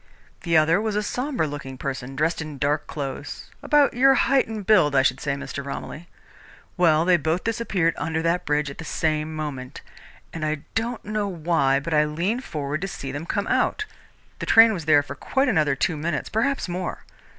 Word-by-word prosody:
The 170 -2 +2
other 160 +5 +4
was 215 -1 -2
a 210 - 0
sombre 250 - -1
looking 140 -3 -6
person, 135 0 -5
dressed 155 +4 0
in 155 -3 -7
dark 145 +1 0
clothes, 140 -3 -6
about 295 -1 +3
your 270 +2 +5
height 275 0 +3
and 215 -3 -6
build, 180 -10 +4
I 135 - +5
should 130 0 +1
say, 140 -1 -1
Mr. 140 0 -6
Romilly. 150 +4 -7 0.7
Well, 165 -3 +3
they 180 -1 +5
both 160 +3 -1
disappeared 210 -7 0
under 160 0 -2
that 170 +2 +1
bridge 150 -1 0
at - - -13
the - - -5
same 155 -1 -1
moment, 145 -3 -6 0.5
and 165 - -5
I 155 -1 -1
don't 230 +1 -2
know 210 -1 -1
why, 165 -6 +1
but 155 +4 -4
I 150 0 +4
leaned 180 +12 -2
forward 150 - -4
to 195 - -2
see 140 -8 -6
them 145 +4 -6
come 200 - -1
out. 430 - +1 0.5
The - - -5
train 225 0 +7
was 170 -6 -5
there 145 -2 +5
for 140 - -7
quite 265 - 0
another 155 - +2
two 160 +2 0
minutes, 150 -2 -2
perhaps 270 +4 0
more. 180 +1 -4
160 Hz, 195 wpm, -24 LUFS, 145-205 Hz, 0.7 s, train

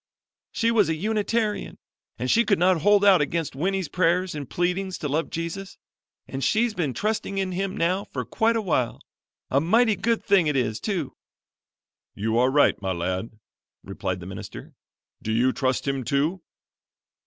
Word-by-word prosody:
"She 230 0 +1
was 210 -7 +3
a 160 - +1
Unitarian, 215 +3 -1 0.4
and 125 +2 -1
she 235 - +5
could 205 -4 +2
not 180 -1 +3
hold 205 +3 +4
out 190 -5 +6
against 150 0 -2
Winnie's 190 +4 -1
prayers 180 +2 +1
and 145 -4 -6
pleadings 180 +2 -1
to 150 - -3
love 155 +4 -1
Jesus, 170 +4 -5 0.5
and 135 0 -5
she's 230 +1 +2
been 155 - -2
trusting 210 -2 -2
in 190 -1 -1
Him 190 +1 -3
now 180 +4 0
for - - -5
quite 230 +1 +1
awhile. 165 - 0 0.5
A 140 - +3
mighty 220 +6 +3
good 230 +1 0
thing 195 -6 +4
it 150 - 0
is, 110 -4 0
too." 180 -10 -3 1.0
"You 110 +2 -1
are 125 +1 +4
right, 145 -6 +3
my 95 -1 -1
lad," 90 +5 -2 0.5
replied 95 -2 -4
the - - -8
minister. 95 +1 -9 0.5
"Do 110 - -3
you 125 +3 +2
trust 130 +1 -1
Him, 135 -1 -1
too?" 145 - 0
170 Hz, 165 wpm, -25 LUFS, 130-200 Hz, 1.0 s, out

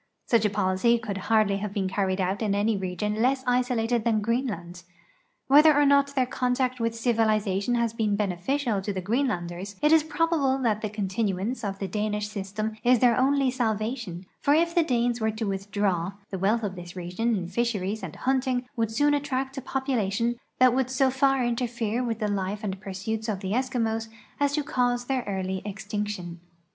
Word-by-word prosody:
Such 230 -3 +3
a - - +4
policy 200 +3 +2
could 215 -4 -5
hardl}^ 215 -3 +3
have 205 0 -5
been 195 -2 0
carried 190 0 -1
out 190 +3 -1
in 205 -2 +1
any 210 +2 +2
region 195 +3 -2
less 260 +2 +2
isolated 245 -2 +1
than 225 -2 +2
Greenland. 205 -6 -2 0.6
Whether 300 +2 +7
or 290 - +5
not 280 0 +3
their 260 -2 +3
contact 250 0 -1
with 230 0 -1
civilization 220 -2 +1
has 235 -1 0
been 215 -3 0
beneficial 205 +4 -1
to 205 - -3
the 190 - -3
Greenlanders, 195 -4 -2
it 300 - +3
is 320 -1 +7
probable 310 -3 +1
that 215 -3 +1
the 215 - -2
continuance 205 +2 -2
of 195 -2 -3
the 195 - -3
Danish 210 +1 -2
system 210 +2 -4
is 250 +1 +5
their 240 0 +4
only 270 0 +2
salvation, 220 -5 -2
for 285 - +3
if 335 +1 +2
the 345 - +4
Danes 245 -5 0
were 220 - +2
to 220 +1 -3
withdraw, 195 -2 -1 0.2
the 190 - -3
wealth 215 +5 +1
of 200 -3 -2
this 175 0 -9
region 185 +6 -1
in 180 -4 -3
fisheries 215 -1 -1
and 180 -5 -7
hunting 255 -1 0
would 225 -3 0
soon 290 +7 +2
attract 270 -2 -1
a - - -8
population 235 -4 -1 0.2
that 255 -1 +5
would 260 -1 +1
so 260 0 +2
far 270 -1 +2
interfere 235 -1 -1
with 230 -3 -2
the 215 -2 -1
life 200 +1 -2
and 195 -2 -4
pursuits 215 +3 -4
of 195 -3 -2
the 190 -1 -3
Eskimos 230 -2 0 0.3
as 285 0 +2
to 300 0 0
cause 245 -2 0
their 260 -1 -1
early 190 -1 -2
extinction. 205 -3 -4
220 Hz, 185 wpm, -26 LUFS, 200-255 Hz, 0.6 s, Whether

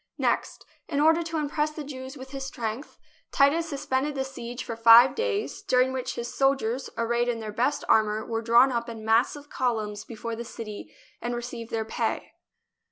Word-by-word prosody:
Next, - - -1 0.2
in 285 - -1
order 320 +3 +5
to 330 -1 -3
impress 300 0 0
the 305 0 -7
Jews 265 -1 -8
with 265 0 -10
his 270 -1 -5
strength, 245 0 -5 0.3
Titus 315 +4 +3
suspended 285 0 -1
the 265 - 0
siege 245 -2 -7
for 230 - -5
five 230 +3 +8
days, 455 -3 -2
during 255 +1 +2
which 260 -1 -3
his 240 0 -5
soldiers, 270 -2 +1
arrayed 235 +1 +1
in 235 -1 -1
their 215 -1 -6
best 250 +6 0
ar 220 - +6
mour, 215 +1 -3
were 225 -1 -2
drawn 235 +3 +5
up 235 -1 -2
in 225 -2 -8
massive 245 +6 +1
columns 215 -4 -1
before 230 0 -6
the 235 - -5
city 225 -3 -8 0.3
and 240 0 -2
received 240 -1 -6
their 225 -1 -2
pay. - - -2
245 Hz, 185 wpm, -26 LUFS, 230-275 Hz, 0.3 s, five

